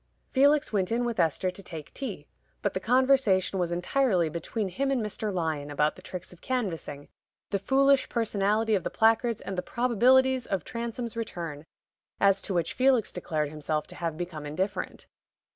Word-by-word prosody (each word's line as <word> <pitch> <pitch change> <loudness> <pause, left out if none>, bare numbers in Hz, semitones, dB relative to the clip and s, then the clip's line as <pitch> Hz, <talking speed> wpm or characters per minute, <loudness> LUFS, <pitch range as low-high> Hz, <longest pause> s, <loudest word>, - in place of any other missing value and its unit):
Felix 285 0 +4
went 190 -2 +1
in 240 +1 +1
with 235 -4 -2
Esther 170 +2 +2
to 195 - -7
take 160 -5 -9
tea, 270 - -5 0.4
but - - 0
the - - -1
conversation 250 -8 +3
was 175 -1 0
entirely 180 -1 +1
between 190 +6 -3
him 270 +10 -1
and 270 -2 +1
Mr. 215 -1 -2
Lyon 160 -5 -2
about 150 +1 +1
the - - -13
tricks 180 0 -8
of 175 - -18
canvassing, 175 - -3 0.4
the 200 - +1
foolish 275 +5 +3
personality 220 -1 +1
of 195 - +2
the - - -2
placards, 225 0 +2
and 195 - -5
the - - 0
probabilities 250 +4 +3
of 190 -5 -1
Transome's 235 0 -4
return, 165 -9 -5 0.5
as 195 -1 +4
to - - -6
which 170 -3 0
Felix 255 -3 +3
declared 155 -4 -2
himself 150 0 -2
to - - -10
have 165 -3 -3
become 170 -3 -5
indifferent. 185 +7 -3
200 Hz, 175 wpm, -28 LUFS, 170-240 Hz, 0.5 s, Felix